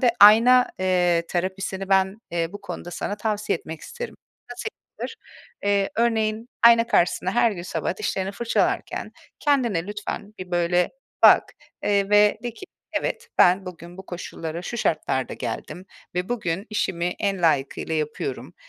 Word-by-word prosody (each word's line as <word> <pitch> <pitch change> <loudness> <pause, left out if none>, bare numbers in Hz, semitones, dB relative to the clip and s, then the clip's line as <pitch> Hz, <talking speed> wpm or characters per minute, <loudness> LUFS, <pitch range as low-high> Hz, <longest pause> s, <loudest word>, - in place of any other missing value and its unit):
de 250 -3 +5
ayna, 235 +5 +8
eee, 180 -2 +2
terapisini 190 +1 -3
ben, 190 0 +3
eee, 170 -1 -1
bu 205 - -8
konuda 195 -3 -7
sana 205 +3 -3
tavsiye 210 -4 -1
etmek 160 0 -9
isterim. 480 0 -7 0.3
Nasıl - - -7 0.3
yapılır? - - -5 0.5
Eee, 200 -1 +2
örneğin, 225 0 +1
ayna 235 0 +7
karşısında 185 -4 +2
her 235 +1 +3
gün 175 -3 -6
sabah - - -3
dişlerini 195 - -2
fırçalarken 230 +3 -1 0.3
kendine 235 - +1
lütfen 210 0 -6
bir, 185 -1 -8
böyle, 175 0 +2 0.3
bak, - - +7 0.3
eee, 200 -1 +1
ve 210 0 +5
de 240 -2 -4
ki: 385 - -10 0.4
"Evet, - - -4
ben 185 +2 +5
bugün 175 0 -10
bu 190 - -10
koşullara 170 -1 -6
şu 235 - -5
şartlarda 150 - -1
geldim 130 +9 -6 0.3
ve 180 +1 -2
bugün 200 -5 -2
işimi 190 -5 -1
en 195 -2 -1
layıkıyla 155 0 +1
yapıyorum 155 - -3
195 Hz, 150 wpm, -24 LUFS, 175-215 Hz, 0.5 s, ayna